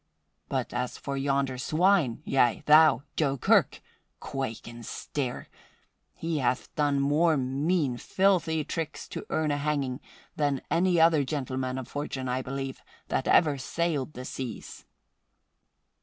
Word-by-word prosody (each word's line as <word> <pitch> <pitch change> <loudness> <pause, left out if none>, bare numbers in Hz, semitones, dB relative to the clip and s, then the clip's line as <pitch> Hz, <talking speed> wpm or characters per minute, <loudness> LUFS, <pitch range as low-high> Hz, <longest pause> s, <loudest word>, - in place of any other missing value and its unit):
But - - -2
as 125 - -2
for 140 - -4
yonder 135 -1 0
swine 160 -3 +2
yea, 125 -1 +2
thou, 150 -4 +6
Joe 140 -3 +1
Kirk! - - +3 0.4
Quake 135 -5 -5
and 120 0 -9
stare! 130 +2 -4 0.7
he 165 -2 -2
hath 125 -1 -1
done 145 -2 +1
more 150 +3 +3
mean, 135 +1 0
filthy 175 -2 +1
tricks 165 +1 -5
to - - -7
earn 155 -1 0
a 145 - 0
hanging 140 -3 -1 0.4
than 145 -3 0
any 175 0 +3
other 160 -3 +5
gentleman 130 -2 -3
of 130 -3 -5
fortune, 135 -2 -4
I 125 +1 -1
believe, 135 0 -5 0.3
that 130 - -1
ever 150 -4 +4
sailed 155 0 -2
the 125 -2 -7
seas." 125 -5 -7
140 Hz, 135 wpm, -28 LUFS, 130-155 Hz, 0.7 s, thou